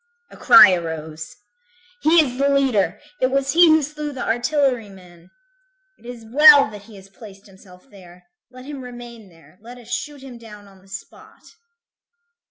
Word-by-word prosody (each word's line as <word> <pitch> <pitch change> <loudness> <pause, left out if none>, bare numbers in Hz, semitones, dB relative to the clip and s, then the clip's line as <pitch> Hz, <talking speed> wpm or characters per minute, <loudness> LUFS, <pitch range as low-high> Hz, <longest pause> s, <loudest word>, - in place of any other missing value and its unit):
A - - -15
cry 190 -1 +6
arose: 160 -2 -7 0.7
"He 320 +2 +4
is 250 -1 -8
the 280 0 +1
leader! 240 -9 0 0.2
It 255 - 0
was 275 0 -2
he 345 +3 +5
who 315 -1 +3
slew 300 +1 -7
the 265 -3 -7
artillery 245 -2 -1
man. 180 -2 -18 0.7
It 235 - -19
is 240 -2 -11
well 285 -1 +6
that 205 -1 -13
he 225 - -16
has 195 -1 -15
placed 195 0 -16
himself 190 0 -20
there. 180 -5 -18 0.3
Let 255 0 -15
him 285 -1 -9
remain 240 -4 -12
there. 165 0 -23
Let 240 +3 -13
us 235 -2 -17
shoot 285 +2 -6
him 250 -3 -12
down 210 -3 -15
on 195 -1 -21
the 195 - -24
spot." 195 0 -14
230 Hz, 175 wpm, -19 LUFS, 190-270 Hz, 0.7 s, cry